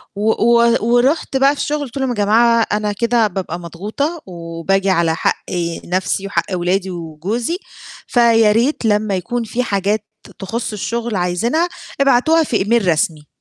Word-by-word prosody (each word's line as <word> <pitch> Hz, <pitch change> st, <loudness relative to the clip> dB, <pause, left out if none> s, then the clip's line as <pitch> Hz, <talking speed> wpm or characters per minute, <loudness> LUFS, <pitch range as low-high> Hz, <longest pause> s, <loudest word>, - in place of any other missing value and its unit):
و 210 Hz, +2 st, +1 dB
و 235 Hz, +1 st, +3 dB
ورُحت 255 Hz, +5 st, +2 dB
بقى 275 Hz, +2 st, +4 dB
في -, -, -4 dB
الشُغل 300 Hz, +1 st, -1 dB
قُلت 255 Hz, 0 st, -9 dB
لهم: 265 Hz, -1 st, -1 dB
"يا 245 Hz, -, -2 dB
جماعة 230 Hz, +3 st, +3 dB
أنا 210 Hz, 0 st, 0 dB
كده 235 Hz, +1 st, +2 dB
بابقى 180 Hz, -3 st, -5 dB
مضغوطة، 215 Hz, -, -4 dB
وباجي 175 Hz, +2 st, -2 dB
على 170 Hz, -3 st, +2 dB
حق -, -, -1 dB, 0.4 s
نفسي 185 Hz, +2 st, -1 dB
وحق 170 Hz, -4 st, -1 dB
ولادي 185 Hz, +2 st, 0 dB
وجوزي، 180 Hz, -, -3 dB, 0.5 s
فياريت 230 Hz, +2 st, +3 dB
لمّا 210 Hz, -2 st, +1 dB
يكون 235 Hz, +7 st, -2 dB
فيه 235 Hz, +3 st, -2 dB
حاجات 205 Hz, -1 st, -1 dB, 0.3 s
تخُص 225 Hz, +4 st, -4 dB
الشُغل 230 Hz, +2 st, -3 dB
عايزينها 195 Hz, -, 0 dB, 0.3 s
ابعتوها 275 Hz, +5 st, +4 dB
في 245 Hz, -7 st, 0 dB
إيميل 215 Hz, 0 st, +1 dB
رسمي." 155 Hz, -2 st, 0 dB
215 Hz, 150 wpm, -18 LUFS, 185-240 Hz, 0.5 s, بقى